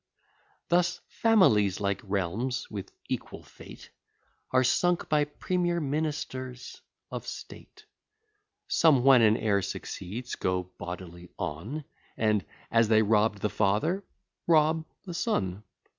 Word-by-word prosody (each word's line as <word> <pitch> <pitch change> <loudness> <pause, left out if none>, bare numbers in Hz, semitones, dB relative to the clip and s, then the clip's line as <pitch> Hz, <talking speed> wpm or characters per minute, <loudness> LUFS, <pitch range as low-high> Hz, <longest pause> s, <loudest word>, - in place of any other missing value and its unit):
Thus 175 0 +2
families, 110 - +3
like 100 -1 -1
realms, 100 +6 -2
with 100 -3 -6 0.2
equal - - -5
fate, - - -13 0.6
Are 130 0 +3
sunk 175 +7 +2
by 150 -1 +3
premier 175 +3 -1
ministers 140 -4 -4 0.3
of - - -6
state. - - -10 0.8
Some, 145 -7 +4
when 135 -2 +7
an 110 0 +5
heir 100 -3 +1
succeeds, 105 +6 -6
go 90 0 0 0.2
bodily 90 0 -8
on, 105 - -4 0.3
And, 105 -2 +2 0.3
as 115 -1 +4
they 110 0 +5
robb'd 105 -1 +2
the 105 - +1
father, 110 - +1 0.4
rob 160 -1 +4 0.2
the 180 - -6
son. 100 - -1
120 Hz, 115 wpm, -28 LUFS, 100-155 Hz, 0.8 s, when